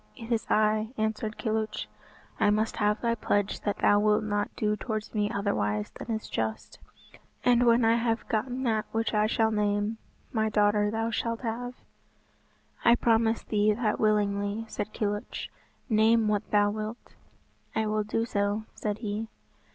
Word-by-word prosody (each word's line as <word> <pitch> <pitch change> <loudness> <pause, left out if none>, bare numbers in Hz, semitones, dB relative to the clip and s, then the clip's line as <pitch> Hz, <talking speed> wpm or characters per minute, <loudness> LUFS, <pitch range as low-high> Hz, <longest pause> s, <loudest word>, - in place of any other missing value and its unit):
"It 230 +1 -9
is 230 -1 0
I," 215 +2 +2
answered 220 0 -2
Kilhuch. 220 - -2 0.5
"I 205 - +4
must 215 +2 +1
have 210 -1 +2
thy 235 -1 +1
pledge 205 -3 0
that 205 - -1
thou 205 - +4
wilt 210 +1 +3
not 205 -1 -1
do 210 -1 0
towards 215 -1 -4
me 210 -2 +1
otherwise 105 - -1
than - - -10
is 220 -1 -2
just, 110 -1 -4 0.7
and 245 0 +4
when 235 0 +5
I 225 +1 +4
have 230 -1 -1
gotten 245 +4 -1
that 220 -3 0
which 225 +1 0
I 210 0 +3
shall 220 0 +2
name, 210 +1 0 0.3
my 220 -2 +1
daughter 210 0 +3
thou 225 +1 -1
shalt 230 0 -2
have." 245 +1 -4 1.1
"I 235 - +6
promise 225 -1 +2
thee 210 0 +2
that 215 -1 -1
willingly," 205 0 +1
said 215 - -4
Kilhuch, 205 -1 -3 0.4
"name 220 -1 +4
what 210 0 0
thou 205 0 +3
wilt." 215 +2 -6 0.6
"I 220 - +1
will 215 0 0
do 225 +2 -1
so," 205 -1 -1
said 210 -1 -3
he. 210 +2 -2
215 Hz, 160 wpm, -28 LUFS, 210-225 Hz, 1.1 s, I